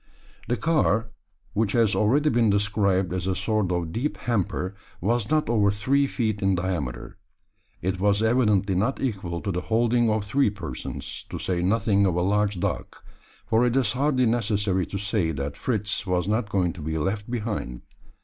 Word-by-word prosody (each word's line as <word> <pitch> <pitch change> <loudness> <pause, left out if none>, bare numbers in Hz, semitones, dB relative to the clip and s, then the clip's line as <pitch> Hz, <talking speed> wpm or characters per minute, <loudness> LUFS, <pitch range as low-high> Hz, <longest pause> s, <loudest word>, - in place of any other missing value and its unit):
The 120 +3 0
car, 115 -8 +1 0.4
which 105 -2 0
has 115 -3 +3
already 140 +8 +3
been 115 -2 +3
described 100 -2 +1
as 90 0 -2
a 95 - 0
sort 105 -3 0
of 85 -2 -1
deep 125 - -2
hamper, 100 -5 -1 0.3
was 110 +3 0
not 155 -1 +2
over 110 -3 +3
three 130 +8 +1
feet 110 -6 -2
in 95 -1 +2
diameter. 90 -9 -3 0.7
It 95 +1 -1
was 100 +2 +2
evidently 105 -5 +2
not 110 +9 0
equal 95 -9 -3
to 100 - -2
the 90 0 -2
holding 115 +3 +2
of 110 -1 +1
three 135 +3 +2
persons 85 -11 -5
to - - -5
say 90 -2 -1
nothing 100 +1 +2
of 90 - 0
a 90 - +1
large 105 0 +1
dog - - -2 0.6
for 115 +2 +2
it 125 0 +1
is 130 -6 +2
hardly 130 -1 +2
necessary 105 -5 +1
to 100 - -4
say 100 -3 0
that 70 0 -4
Fritz 105 -4 -1
was 90 0 0
not 110 +1 0
going 90 -5 +1
to 85 - -10
be 80 +1 -2
left 100 +7 -2
behind. 105 - -4
105 Hz, 180 wpm, -25 LUFS, 95-115 Hz, 0.7 s, has